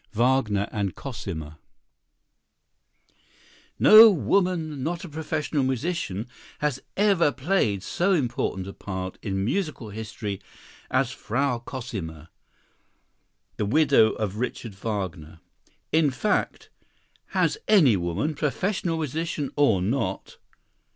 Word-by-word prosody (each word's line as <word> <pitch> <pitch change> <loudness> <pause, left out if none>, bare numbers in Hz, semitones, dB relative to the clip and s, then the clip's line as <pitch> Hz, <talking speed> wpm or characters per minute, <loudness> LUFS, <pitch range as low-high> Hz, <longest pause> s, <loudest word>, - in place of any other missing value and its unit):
Wagner 115 -4 +2
and 100 -4 -2
Cosima 80 - -6 2.2
No 220 +1 +10
woman 165 - 0
not 170 +6 -3
a - - -9
professional 155 -1 -2
musician 130 - -2 0.3
has 145 -3 -1 0.2
ever 195 -7 +4
played 130 - 0
so 185 +3 0
important 125 - -1
a 100 - -7
part 95 -1 -6
in 95 -1 -2
musical 155 - -2
history 105 -2 -5 0.5
as - - +1
"Frau 125 +1 -1
Cosima," 100 - -7 1.3
the 105 - 0
widow 140 -3 +4
of 105 -2 -3
Richard 115 -2 -4
Wagner. 95 -6 -5 0.5
In 160 -2 +4
fact, 145 +11 -1 0.6
has 430 - 0
any 155 - +6
woman, 90 - -1
professional 165 +4 -1
musician 155 -1 -3
or 115 -11 +3
not? 100 -3 -2
130 Hz, 105 wpm, -25 LUFS, 100-160 Hz, 2.2 s, No